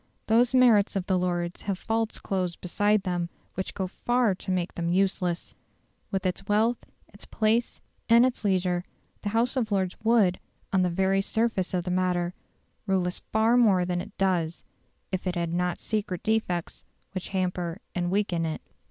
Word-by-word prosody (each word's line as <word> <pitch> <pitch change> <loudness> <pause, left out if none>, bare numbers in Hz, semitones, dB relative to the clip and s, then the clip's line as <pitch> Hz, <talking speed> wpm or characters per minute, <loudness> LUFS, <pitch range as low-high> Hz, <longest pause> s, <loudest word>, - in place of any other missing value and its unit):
Those 240 +3 +3
merits 230 -6 +5
of 190 -2 -1
the 190 - +1
Lords 175 -1 -1
have 195 -2 -2
faults 225 +2 -1
close 185 -3 -2
beside 205 +3 +1
them 175 -2 -2 0.2
which 190 - -4
go 190 - -1
far 240 +3 +1
to 185 - -8
make 180 -1 -1
them 170 0 -2
useless. 185 -2 0 0.6
With 195 -2 -2
its 180 -1 -2
wealth, 220 +3 +2 0.3
its 200 - -10
place, 225 +2 +1 0.3
and 235 +2 +7
its 255 -3 -1
leisure, 180 -3 +1 0.4
the 205 - -2
House 230 +4 +2
of 230 -5 -1
Lords 190 -2 0
would, 220 -5 +3 0.3
on 190 - +4
the 180 - +2
very 190 +2 +2
surface 220 -2 0
of 175 - 0
the 180 - -3
matter, 180 -1 0 0.5
rule 190 -2 +2
us 180 - -2
far 220 +2 +3
more 200 -7 +4
than 175 0 -1
it - - -11
does 175 -4 0 0.5
if 185 0 -2
it 180 - -1
had 170 -1 -1
not 180 0 0
secret 205 -5 -3
defects 215 -6 -1 0.3
which 185 -2 -5
hamper 180 -2 -2 0.2
and 175 -1 -1
weaken 190 -3 0
it. 160 -1 -3
190 Hz, 175 wpm, -27 LUFS, 180-215 Hz, 0.6 s, and